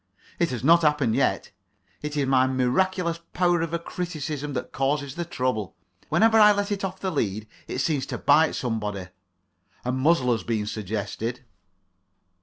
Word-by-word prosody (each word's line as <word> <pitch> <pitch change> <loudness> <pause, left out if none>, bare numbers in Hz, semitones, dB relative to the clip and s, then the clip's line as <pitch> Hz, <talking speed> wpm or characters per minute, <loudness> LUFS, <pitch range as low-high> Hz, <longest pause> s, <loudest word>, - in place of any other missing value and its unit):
It 170 - +2
has 125 -2 -4
not 170 +4 +6
happened 150 -7 +2
yet. 135 - 0 0.5
It 150 0 -4
is 140 - +2
my 130 -1 +3
miraculous 170 +7 0
power 175 -1 +2
of 170 +1 -3
criticism 150 -4 -4
that 130 - -4
causes 140 0 -1
the 175 0 -4
trouble. 125 - -2 0.3
Whenever 225 0 +4
I 210 -1 +8
let 205 0 -2
it 200 -1 -2
off 190 -1 -4
the 190 - -2
lead 110 - -2 0.2
it - - -4
seems 145 -2 0
to - - -4
bite 150 +3 +4
somebody; 105 -6 -3 0.8
a 125 - 0
muzzle 130 0 +2
has 115 -2 0
been 110 -3 -1
suggested. 110 +4 -4
145 Hz, 160 wpm, -25 LUFS, 125-170 Hz, 0.8 s, I